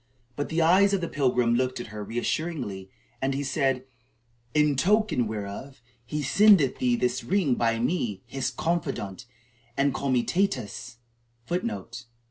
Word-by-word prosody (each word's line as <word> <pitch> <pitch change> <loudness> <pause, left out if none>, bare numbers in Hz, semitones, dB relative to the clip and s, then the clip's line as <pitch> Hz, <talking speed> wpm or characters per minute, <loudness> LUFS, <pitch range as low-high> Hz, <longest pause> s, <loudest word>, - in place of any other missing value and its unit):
But 145 - -3
the 165 0 +1
eyes 195 +4 +5
of 190 - -2
the 170 - -2
pilgrim 125 -5 +1
looked 130 +1 0
at 110 -3 -8
her 105 -1 -5
reassuringly, 115 - -3 0.3
and 135 0 0
he 140 - -2
said: 135 -2 0 0.7
"In 150 -1 +4
token 195 - +2
whereof, 110 +5 -6 0.2
he 150 +5 -3
sendeth 185 -2 +5
thee 125 -1 +2
this 125 +1 -1
ring 185 -8 +2
by 115 -1 +1
me, 115 - -1
his 135 -1 -2
confidant 135 - -3 0.5
and 140 0 +2
comitatus,(1) 120 - -3
Aurelian 220 +6 -1
of - - -4
Soissons." 125 -1 -11
130 Hz, 145 wpm, -26 LUFS, 115-160 Hz, 0.7 s, eyes